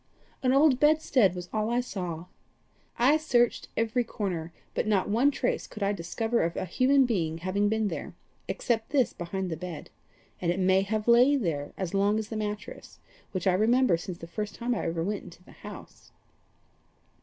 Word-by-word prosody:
An 255 - +2
old 275 -1 +5
bedstead 280 - +3
was 180 0 -6
all 215 0 0
I 240 +1 +1
saw. 180 -8 -4 0.7
I 265 +6 +5
searched 245 -6 +1
every 230 +2 +1
corner, 180 -7 -4 0.2
but - - -1
not 205 -3 +2
one 235 +7 +3
trace 260 -3 -1
could 210 - -6
I 200 +1 +2
discover 225 +6 -1
of 170 +1 -1
human 260 +9 +3
being 165 -9 -1
having 190 +4 0
been 220 0 +1
there, - - -5 0.3
except 225 -2 -1
this 270 -4 +2
behind 180 +1 -4
the 160 - -3
bed 175 -2 -7 0.5
and 170 -1 +1
it 175 - -2
may 190 +1 +4
have 210 +2 -2
lain 250 +3 +5
there 145 -5 -2
as 190 -2 -3
long 200 +2 +2
as 220 -1 -3
the 225 - -5
mattress, 210 -1 -5 0.3
which 185 -2 -3
I 190 - +4
remember 230 +2 +3
since 175 +1 -6
the 165 - -9
first 210 +5 -5
time 245 +1 -1
I 225 - -2
ever 165 0 -1
went 205 +2 -2
into 175 +1 -14
the - - -17
house." - - -12
210 Hz, 185 wpm, -28 LUFS, 180-240 Hz, 0.7 s, old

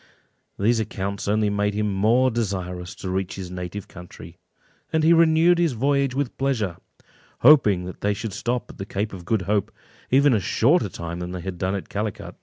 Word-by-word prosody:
These 115 +3 +2
accounts 100 -2 -4
only 105 0 +2
made 105 0 0
him 105 -1 0
more 115 +7 +3
desirous 90 -6 -3
to 95 - -6
reach 95 0 -2
his 95 -2 -7
native 90 +2 -6
country, 85 -1 -12 0.5
and 160 -1 +1
he 165 +2 +6
renewed 165 +1 +4
his 170 -5 +2
voyage 135 +2 +1
with 140 -3 -2
pleasure, 115 -10 -1 0.6
hoping 105 -12 +6
that 90 - -9
they 105 0 +1
should 110 -1 -5
stop 120 +4 -3
at - - -17
the 95 - -4
Cape 105 +2 -3
of 90 -3 -9
Good 110 -1 0
Hope 100 +1 0 0.4
even 140 +1 +4
a 110 - +3
shorter 120 - +2
time 85 0 -6
than 90 +1 -5
they 90 - -5
had 90 -1 -6
done 95 +1 -1
at 100 - -5
Calicut. 105 0 -4
105 Hz, 195 wpm, -23 LUFS, 95-125 Hz, 0.6 s, he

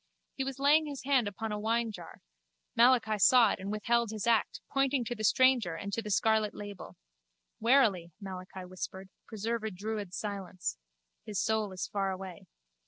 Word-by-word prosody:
He 270 - -3
was 270 0 -4
laying 295 +3 +4
his 285 -2 -6
hand 260 -5 +2
upon 215 +2 -4
a 210 - -3
winejar: 220 -5 -2 0.5
Malachi 235 -3 +4
saw 235 0 +6
it - - -3
and 195 +2 -5
withheld 235 +2 +1
his 215 +1 -4
act, 230 -2 +2
pointing 275 -2 +1
to 240 - -3
the 215 -2 -6
stranger 245 -7 +4
and 200 +4 -6
to 230 - -1
the 210 - -7
scarlet 215 +1 +2
label. 205 -2 -8 0.6
Warily, 220 -8 +3
Malachi 185 -1 -8
whispered, 190 +1 -7 0.2
preserve 225 +1 -3
a 220 - -1
druid 205 -1 -5
silence. 195 - -4 0.4
His 205 -3 -3
soul 220 -2 0
is 185 - -4
far 195 -1 -1
away. 185 -2 -7
215 Hz, 170 wpm, -31 LUFS, 195-235 Hz, 0.6 s, saw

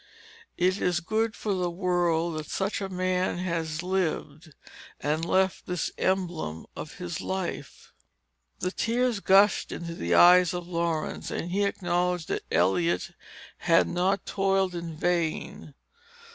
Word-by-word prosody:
It 185 +2 +1
is 175 -1 +1
good 220 +5 -1
for 210 - -2
the 180 -2 0
world 175 -2 0
that 150 - -8
such 195 +1 -2
a 195 - -3
man 185 -1 0
has 170 -2 -2
lived, 165 -4 -2 0.4
and 155 +3 -1
left 190 +2 +1
this 180 -3 -2
emblem 175 - -1
of 155 - -7
his 175 -4 -5
life." 190 -2 -5 0.7
The 180 - 0
tears 235 +1 0
gushed 200 +1 +4
into 170 -1 -5
the 85 - 0
eyes 180 - +7
of 175 -1 -5
Laurence, 170 -3 -2
and 175 - -4
he 200 +2 +1
acknowledged 180 -3 -1
that - - -1
Eliot 165 - +1 0.5
had 170 -1 +3
not 185 +3 0
toiled 195 -1 +1
in 170 -2 -6
vain. 165 -4 -2
180 Hz, 135 wpm, -27 LUFS, 165-190 Hz, 0.7 s, eyes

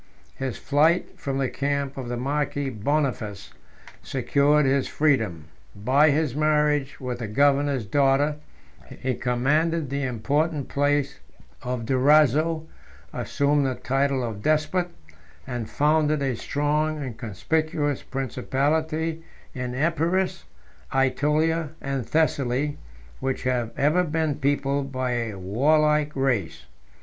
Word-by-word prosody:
His 130 -2 -4
flight 155 +5 +1
from 135 -1 -3
the 135 -1 +1
camp 140 -1 -2
of 130 -3 -6
the 120 - -2
marquis 140 +1 -1
Boniface 110 -4 -2 0.5
secured 140 +3 +2
his 135 0 +2
freedom; 110 - +1 0.3
by 130 +9 +4
his 145 -2 +1
marriage 150 -2 +1
with 125 -3 -4
the 115 - -4
governor's 140 +1 +2
daughter, 140 +5 +2 0.7
he 130 0 +1
commanded 145 +6 0
the 140 0 -1
important 140 +4 -1
place 145 0 0 0.4
of 125 -2 -3
Durazzo, 150 +5 +3 0.5
assumed 145 0 +1
the 130 - -1
title 135 0 0
of 110 -4 -5
despot, 155 - +1 0.6
and 120 -4 -5
founded 150 0 +2
a 130 -3 0
strong 150 +5 0
and 130 -6 -5
conspicuous 145 - -1
principality 155 +5 -1 0.3
in 125 -2 -4
Epirus, 170 +5 0 0.5
Ætolia, 150 +4 +1
and 135 -3 -3
Thessaly, 145 -2 0 0.4
which 135 0 -2
have 125 -3 0
ever 155 +6 +3
been 160 -2 0
peopled 140 0 0
by 130 -1 -2
a 115 -4 -2
warlike 150 +10 +2
race. 130 -9 -1
140 Hz, 115 wpm, -25 LUFS, 130-150 Hz, 0.7 s, by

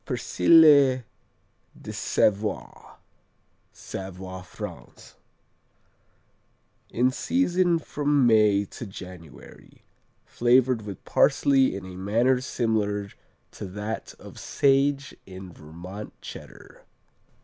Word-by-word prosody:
Persillé 140 - +5 0.8
de - - -8
Savoie 105 0 -1 0.7
Savoie, 95 -1 -8
France 90 - -10 1.8
In 125 +2 +1
season 180 - +1
from 145 -3 0
May 105 -3 +4
to 115 - -9
January, 90 -4 -13 0.4
flavored 125 0 +2
with 100 -3 -9
parsley 135 -6 +3
in 95 -1 -7
a 95 -1 -9
manner 115 +7 +1
similar 105 -5 -1 0.4
to - - -8
that 105 +4 -6
of - - -12
sage 140 0 +1
in 95 -1 -10
Vermont 85 +7 -10
Cheddar. - - -12
110 Hz, 85 wpm, -25 LUFS, 95-135 Hz, 1.8 s, Persillé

